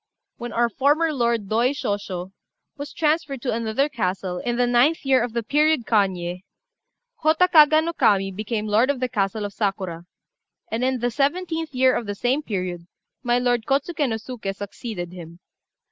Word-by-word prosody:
"When 240 Hz, -2 st, -6 dB
our 235 Hz, +1 st, +2 dB
former 295 Hz, +7 st, +1 dB
lord, 235 Hz, -5 st, 0 dB
Doi 235 Hz, +6 st, +2 dB
Shosho, 200 Hz, -7 st, -4 dB, 0.4 s
was 285 Hz, 0 st, -7 dB
transferred 305 Hz, -5 st, -1 dB
to 250 Hz, -, -1 dB
another 230 Hz, +5 st, 0 dB
castle, 185 Hz, -7 st, -3 dB
in 240 Hz, +4 st, -2 dB
the 245 Hz, +1 st, +2 dB
9th 245 Hz, +7 st, +2 dB
year 265 Hz, -2 st, +4 dB
of 240 Hz, -2 st, -4 dB
the 235 Hz, -1 st, -1 dB
period 300 Hz, +1 st, +2 dB
Kanyé, 185 Hz, -5 st, 0 dB, 0.8 s
Hotta 320 Hz, +3 st, +3 dB
Kaga 310 Hz, -2 st, +6 dB
no 335 Hz, +1 st, -2 dB
Kami 195 Hz, -8 st, +2 dB
became 215 Hz, +2 st, -3 dB
lord 215 Hz, +5 st, +2 dB
of 285 Hz, -3 st, 0 dB
the 255 Hz, -, 0 dB
castle 205 Hz, -3 st, -1 dB
of 200 Hz, -, -6 dB
Sakura; 190 Hz, -5 st, -3 dB, 0.7 s
and 225 Hz, +2 st, -1 dB
in 260 Hz, -1 st, 0 dB
the 245 Hz, 0 st, 0 dB
17th 320 Hz, +1 st, -1 dB
year 255 Hz, 0 st, +4 dB
of 230 Hz, -, -3 dB
the 205 Hz, -, -3 dB
same 250 Hz, +7 st, 0 dB
period, 180 Hz, -, -4 dB, 0.3 s
my 240 Hz, 0 st, +1 dB
lord 245 Hz, -2 st, 0 dB
Kôtsuké 285 Hz, +1 st, 0 dB
no 225 Hz, -, -1 dB
Suké 220 Hz, -3 st, -6 dB
succeeded 200 Hz, -3 st, -6 dB
him. 170 Hz, -1 st, -11 dB
240 Hz, 175 wpm, -23 LUFS, 200-280 Hz, 0.8 s, Kaga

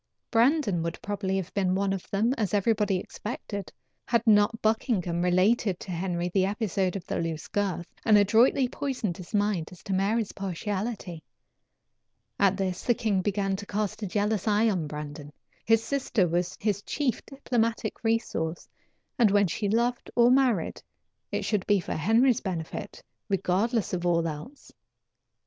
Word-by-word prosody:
Brandon 235 Hz, -, +3 dB
would 170 Hz, 0 st, -3 dB
probably 200 Hz, -2 st, -2 dB
have 185 Hz, -2 st, -4 dB
been 185 Hz, -2 st, +1 dB
one 195 Hz, 0 st, +1 dB
of 195 Hz, -, -6 dB
them, 220 Hz, +5 st, +1 dB
as 210 Hz, -6 st, -1 dB
everybody 205 Hz, -1 st, +2 dB
expected, 200 Hz, 0 st, -6 dB, 0.4 s
had 235 Hz, -1 st, +2 dB
not 210 Hz, 0 st, +4 dB
Buckingham 215 Hz, -6 st, 0 dB
related 185 Hz, +2 st, +2 dB
to 190 Hz, -, -7 dB
Henry 175 Hz, 0 st, -2 dB
the 185 Hz, +1 st, +2 dB
episode 195 Hz, -2 st, -1 dB
of 190 Hz, -, -5 dB
the -, -, -2 dB
loose 165 Hz, -2 st, -3 dB
girth, 190 Hz, -4 st, -1 dB, 0.2 s
and 215 Hz, -1 st, +6 dB
adroitly 230 Hz, +6 st, +4 dB
poisoned 245 Hz, -9 st, -3 dB
his 180 Hz, -, -10 dB
mind 205 Hz, -6 st, 0 dB
as 180 Hz, -, -14 dB
to 195 Hz, -, -3 dB
Mary's 200 Hz, +3 st, +1 dB
partiality. 195 Hz, -1 st, -4 dB, 1.2 s
At 195 Hz, -1 st, +3 dB
this 185 Hz, -2 st, -2 dB
the 240 Hz, -, +2 dB
king 205 Hz, -5 st, 0 dB
began 195 Hz, 0 st, 0 dB
to 205 Hz, -, -8 dB
cast 210 Hz, +1 st, -2 dB
a 205 Hz, -, -2 dB
jealous 205 Hz, +1 st, 0 dB
eye 215 Hz, +1 st, +3 dB
on 175 Hz, -6 st, -2 dB
Brandon. 150 Hz, 0 st, -7 dB, 0.3 s
His 225 Hz, 0 st, +4 dB
sister 245 Hz, -7 st, +1 dB
was 175 Hz, +2 st, -1 dB
his 205 Hz, -2 st, 0 dB
chief 265 Hz, +2 st, -2 dB
diplomatic 230 Hz, -5 st, -2 dB
resource, 225 Hz, -8 st, -1 dB, 0.5 s
and 230 Hz, -3 st, +6 dB
when 200 Hz, 0 st, +4 dB
she 200 Hz, +3 st, -2 dB
loved 235 Hz, +3 st, 0 dB
or 240 Hz, 0 st, +6 dB
married, 255 Hz, -9 st, +2 dB, 0.5 s
it -, -, -2 dB
should 205 Hz, -4 st, -1 dB
be 205 Hz, -1 st, +4 dB
for 175 Hz, -, -4 dB
Henry's 230 Hz, -, +3 dB
benefit, 170 Hz, -5 st, -5 dB, 0.3 s
regardless 200 Hz, +4 st, 0 dB
of 175 Hz, -1 st, -1 dB
all 170 Hz, -1 st, +2 dB
else. 160 Hz, -, -8 dB
205 Hz, 160 wpm, -27 LUFS, 180-225 Hz, 1.2 s, and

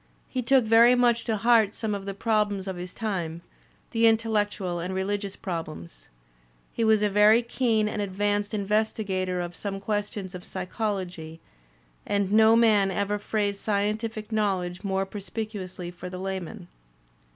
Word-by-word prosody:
He 255 Hz, -, -2 dB
took 255 Hz, 0 st, +3 dB
very 230 Hz, +3 st, +6 dB
much 240 Hz, -1 st, +2 dB
to 220 Hz, -2 st, 0 dB
heart 225 Hz, -1 st, +4 dB
some 220 Hz, -2 st, -2 dB
of 200 Hz, -1 st, -5 dB
the 195 Hz, -, -4 dB
problems 205 Hz, -2 st, 0 dB
of 190 Hz, -, -3 dB
his 180 Hz, +1 st, -6 dB
time, 175 Hz, -7 st, -4 dB, 0.5 s
the 230 Hz, -1 st, +4 dB
intellectual 210 Hz, -5 st, 0 dB
and 180 Hz, +2 st, -4 dB
religious 200 Hz, +1 st, -2 dB
problems. 155 Hz, -, -7 dB, 0.7 s
He 230 Hz, -, -1 dB
was 220 Hz, -1 st, +4 dB
a -, -, +4 dB
very 210 Hz, +3 st, +5 dB
keen 230 Hz, -3 st, +1 dB
and 210 Hz, 0 st, -3 dB
advanced 205 Hz, +2 st, -1 dB
investigator 200 Hz, -3 st, -1 dB
of 175 Hz, -1 st, -4 dB
some 195 Hz, +1 st, -4 dB
questions 205 Hz, -2 st, -3 dB
of 180 Hz, -1 st, -8 dB
psychology, 185 Hz, -5 st, -4 dB, 0.6 s
and 200 Hz, -1 st, 0 dB
no 220 Hz, +1 st, +6 dB
man 215 Hz, -4 st, +4 dB
ever 200 Hz, +2 st, -1 dB
phrased 205 Hz, -1 st, -1 dB
scientific 215 Hz, +2 st, -2 dB
knowledge 190 Hz, -4 st, -1 dB
more 195 Hz, -1 st, 0 dB
perspicuously 195 Hz, -3 st, -6 dB
for 180 Hz, +1 st, -8 dB
the 185 Hz, -, -7 dB
layman. 190 Hz, 0 st, -5 dB
205 Hz, 150 wpm, -26 LUFS, 185-220 Hz, 0.7 s, very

